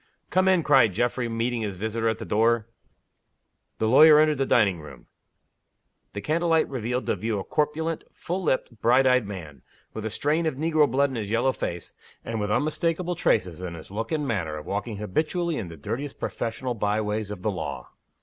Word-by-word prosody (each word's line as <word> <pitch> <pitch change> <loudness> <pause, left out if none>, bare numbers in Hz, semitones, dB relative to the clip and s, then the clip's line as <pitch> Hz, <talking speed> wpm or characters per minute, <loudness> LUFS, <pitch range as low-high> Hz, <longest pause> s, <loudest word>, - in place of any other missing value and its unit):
"Come 185 0 +3
in!" 185 -3 +4
cried 130 -9 +5
Geoffrey, 120 +3 0
meeting 115 +1 -1
his 105 -3 -3
visitor 110 +3 -1
at 110 - -1
the - - -7
door. 115 +1 +2 1.1
The 110 - 0
lawyer 150 +6 +8
entered 155 -2 +3
the 135 - +1
dining 100 -7 +3
room. 70 -5 -12 1.1
The 100 - -5
candle 165 +9 0
light 160 -1 +3
revealed 125 -1 -3
to - - 0
view 110 -1 -2
a 95 - -3
corpulent, 155 +4 -1
full 180 +3 -4
lipped, 130 - -1
bright 125 +3 +4
eyed 125 -4 +3
man 85 -8 -8 0.3
with 110 - -5
a 110 - -2
strain 155 +8 0
of 155 - -1
negro 155 0 +2
blood 140 +3 +2
in 130 - -4
his 105 -3 -4
yellow 120 +4 +2
face, 85 -8 -5 0.3
and 115 -1 -3
with 105 0 -2
unmistakable 165 - 0
traces 90 - 0
in 90 -2 -5
his 80 +3 -11
look 110 +3 -4
and 150 -3 -1
manner 85 -10 -2
of 75 - -8
walking 105 +2 -3
habitually 155 - -1
in 100 - -4
the 85 -1 -10
dirtiest 135 - -5
professional 120 +2 -3
by 105 -1 0
ways 105 -1 -2
of 105 -3 -7
the 110 - +1
law. 95 - -6
115 Hz, 195 wpm, -25 LUFS, 105-150 Hz, 1.1 s, lawyer